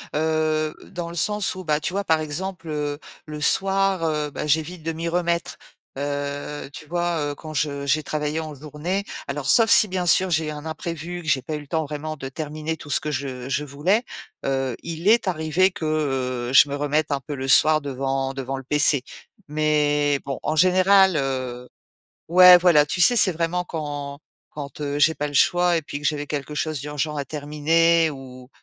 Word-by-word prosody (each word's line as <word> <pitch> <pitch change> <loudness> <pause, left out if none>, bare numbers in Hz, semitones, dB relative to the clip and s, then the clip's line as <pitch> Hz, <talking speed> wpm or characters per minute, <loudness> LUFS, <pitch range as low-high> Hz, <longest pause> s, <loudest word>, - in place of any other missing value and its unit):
heu, 155 0 0
dans 170 -1 -6
le 170 - -9
sens 210 +3 +1
où 185 - -7
bah, 150 -3 0
tu 155 +3 -3
vois? 200 +1 -1
Par 160 -4 +2
exemple, 165 +3 -5
heu, 150 -1 -3 0.3
le 150 0 -7
soir, 195 +2 +1
heu, 150 -2 -1
bah, 150 - -5
j'évite 160 +3 -1
de 165 - -2
m'y 165 +1 -4
remettre. 170 -1 -1 0.4
Heu, 145 0 -4
tu 150 - -10
vois? 175 0 -1
Heu, 145 -1 -3
quand 155 +1 -9
je 145 -1 -2
j'ai 155 +3 +2
travaillé 150 +1 -3
en 155 -2 -6
journée 150 +7 -4 0.2
alors 140 0 -4
sauf 230 -2 +5
si 215 - +7
bien 180 -2 -3
sûr 185 +2 +3
j'ai 160 -1 0
un 150 0 -7
imprévu, 170 +2 -5
que 160 - -12
j'ai 130 -3 +1
pas 155 - -5
eu 150 - -3
le 145 - -13
temps 160 +2 -1
vraiment 155 +1 -6
de 135 -2 -6
terminer 155 +3 -5
tout 145 - -12
ce - - +2
que 150 - -4
je 130 -2 -4
je 140 +2 -1
voulais. 150 - 0 0.4
Heu, 135 -2 -1
il 170 +2 -5
est 220 -2 +4
arrivé 170 +2 +2
que, 175 -3 -7 0.6
heu, - - -4
je 140 - +7
me 140 - -4
remette 145 +1 -1
un 140 - 0
peu 145 +3 -6
le 135 0 -5
soir 155 +3 +5
devant 135 -1 -3
devant 135 0 -4
le 135 - -8
PC 145 -1 +5 0.5
mais 150 -1 +1
bon, 135 -2 -4
en 155 - -2
général, 185 +2 +5
heu 130 -3 -3 0.6
ouais 180 +1 +9
voilà, 170 -4 +4
tu 175 - -3
sais? 240 +8 +5
C'est 200 -4 +5
vraiment 170 +2 -2
quand 145 -3 -6 0.3
quand, 145 0 -8
heu, 145 0 -3
j'ai 155 +2 +4
pas 150 - -2
le 145 - -7
choix 175 +4 +3
et 165 - -1
puis 145 -1 -6
que 145 - -4
j'avais 145 -1 -2
quelque 150 0 -4
chose 155 0 -2
d'urgent 150 +1 -3
à 140 - -3
terminer 155 +3 +2
où 130 -2 -11
155 Hz, 205 wpm, -23 LUFS, 145-170 Hz, 0.6 s, ouais